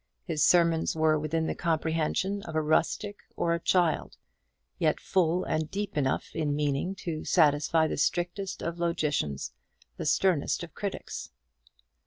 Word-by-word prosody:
His 155 -4 0
sermons 170 -2 +4
were 155 -1 +3
within 160 +2 -1
the - - -1
comprehension 165 +4 0
of 165 -4 -8
a 155 - +2
rustic 165 +6 +1 0.2
or 170 - +1
a 170 - 0
child, 175 -2 +1 0.6
yet - - +2
full 180 -1 +1
and 155 0 -1
deep 205 +1 -4
enough 135 -3 0
in 150 -2 0
meaning 145 +5 -1
to 160 -3 -3
satisfy 155 0 +3
the - - -2
strictest 175 +5 -1
of 170 +1 -3
logicians, 150 - -1 0.4
the - - -3
sternest 180 -4 +2
of 170 - -9
critics. 200 -2 -5
165 Hz, 145 wpm, -28 LUFS, 155-175 Hz, 0.6 s, sermons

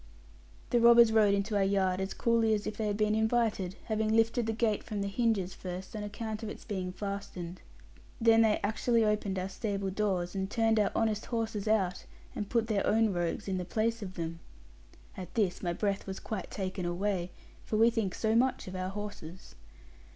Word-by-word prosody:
The 240 - +4
robbers 235 -1 +7
rode 210 -2 +5
into 200 +2 -1
our 200 - +3
yard 190 -1 +1
as 190 - -3
coolly 230 -2 +2
as 210 - -4
if 215 - -3
they 215 0 -2
had 205 -1 -1
been 210 0 +2
invited, 220 -4 +1
having 220 -1 0
lifted 225 +1 +2
the - - +1
gate 220 -1 0
from 210 -3 -4
the 200 - -1
hinges 200 -3 0
first 185 +4 -7
on 215 - -3
account 215 +1 -5
of 220 - -4
its - - -9
being 185 -3 -3
fastened. 185 -3 -6 0.6
Then 225 -1 +5
they 220 -2 +3
actually 225 +2 +2
opened 210 -2 0
our 185 0 -2
stable 195 0 -3
doors, 185 -3 -1
and 190 -1 -2
turned 225 -1 +2
our 205 - +2
honest 220 -2 0
horses 225 -3 -2
out, 195 -5 +1 0.3
and 205 -2 -4
put 230 -2 +2
their 215 -3 0
own 220 -1 +3
rogues 175 +3 -2
in 190 -1 -1
the - - -2
place 225 +5 -1
of 185 -2 -6
them. 165 -1 -4 0.8
At 185 -4 -8
this 200 -5 +1
my 175 - -1
breath 200 +3 -2
was 190 0 -5
quite 210 -5 -5
taken 190 -1 -4
away; 180 0 -1 0.3
for 215 - -2
we 230 +2 +5
think 220 -6 -1
so 220 -1 0
much 255 -1 +2
of 185 - -6
our 185 0 -2
horses. 195 -4 -8
210 Hz, 200 wpm, -31 LUFS, 190-225 Hz, 0.8 s, robbers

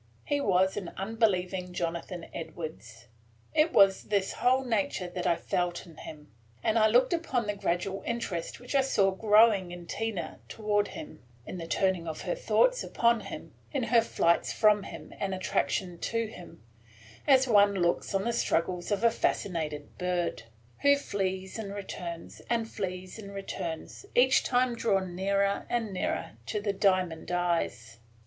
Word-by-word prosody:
He 285 0 0
was 190 -4 +2
an 195 -4 -5
unbelieving 190 -4 0
Jonathan 170 0 -3
Edwards. 120 - -7 0.5
It 310 +2 +4
was 195 -6 +5
this 200 -2 0
whole 255 +2 +2
nature 205 -6 -1
that 175 0 -3
I 170 - +4
felt 175 +1 -2
in 165 -3 -15
him, 150 -1 -10 0.3
and 220 +1 +3
I 215 - +6
looked 245 +7 +4
upon 295 -9 0
the 205 - -1
gradual 190 0 -1
interest 210 -8 -3
which 245 +2 -7
I 275 - +5
saw 200 -7 +2
growing 210 -2 +4
in 175 -1 -8
Tina 195 -4 -4
toward 205 -2 0
him, 315 -2 -9 0.2
in 185 - -6
the 165 - -6
turning 185 -1 +1
of 160 - -5
her - - -1
thoughts - - +2
upon 235 -1 +2
him, - - -8 0.2
in 275 -4 -1
her 230 0 +4
flights 170 -6 +1
from 210 -1 +4
him - - -9
and 195 -1 -1
attraction 185 -1 -1
to 230 +4 -1
him, 180 - -11 0.6
as 265 -2 +6
one 205 -3 +5
looks 175 +2 0
on 195 - +1
the 235 - 0
struggles 175 -4 0
of 205 +2 0
a 230 - +6
fascinated 155 -9 -2
bird, 180 -1 -1 0.4
who 285 0 +5
flees 190 -6 -3
and 200 -2 -5
returns, 175 -4 -7
and 230 -1 +1
flees 185 -1 -5
and 200 -2 -9
returns, 175 - -6
each 260 +1 +5
time 250 -1 +2
drawn 195 -6 0
nearer 200 +1 +1
and 230 -4 -1
nearer 185 - -2 0.2
to 210 - -1
the 205 -1 -1
diamond 185 -4 +1
eyes. 165 -10 -1
195 Hz, 160 wpm, -29 LUFS, 175-225 Hz, 0.6 s, I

